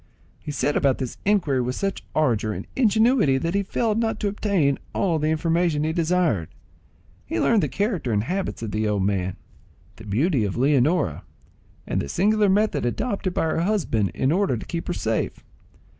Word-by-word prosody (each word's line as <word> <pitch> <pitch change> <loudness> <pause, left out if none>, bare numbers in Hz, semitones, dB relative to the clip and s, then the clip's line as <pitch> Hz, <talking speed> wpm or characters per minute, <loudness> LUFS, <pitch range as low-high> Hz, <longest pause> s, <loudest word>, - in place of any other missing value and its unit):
He - - -9
set 145 0 0
about 135 -3 +2
this 130 -3 -5
inquiry 175 -11 +2
with 125 +1 -2
such 195 -1 -3
ardour 115 -8 +1
and - - -6
ingenuity, 220 - +3
that 165 +5 -2
he 200 - +2
failed 215 +2 -1
not 225 -2 -1
to 210 - +1
obtain 195 -9 +1 0.2
all 170 -5 +1
the 155 - 0
information 165 -1 +1
he 160 +1 0
desired. 165 - +1 0.7
He 110 - -3
learned 225 - +3
the - - +1
character 200 - -1
and 105 -1 +1
habits 185 -2 -3
of 110 - -4
the 110 +1 0
old 105 -2 0
man, 95 -2 -1 0.6
the 110 - -11
beauty 125 - +1
of 100 0 -2
Leonora, 140 - +2 0.6
and - - -1
the 70 - -5
singular 210 - +2
method 210 +3 +2
adopted 190 - -2
by - - +1
her 160 0 0
husband 165 - 0
in 135 - +1
order 185 -7 +1
to - - -8
keep 170 -1 -5
her 175 - -1
safe. 110 -7 -2
160 Hz, 185 wpm, -24 LUFS, 120-200 Hz, 0.7 s, ingenuity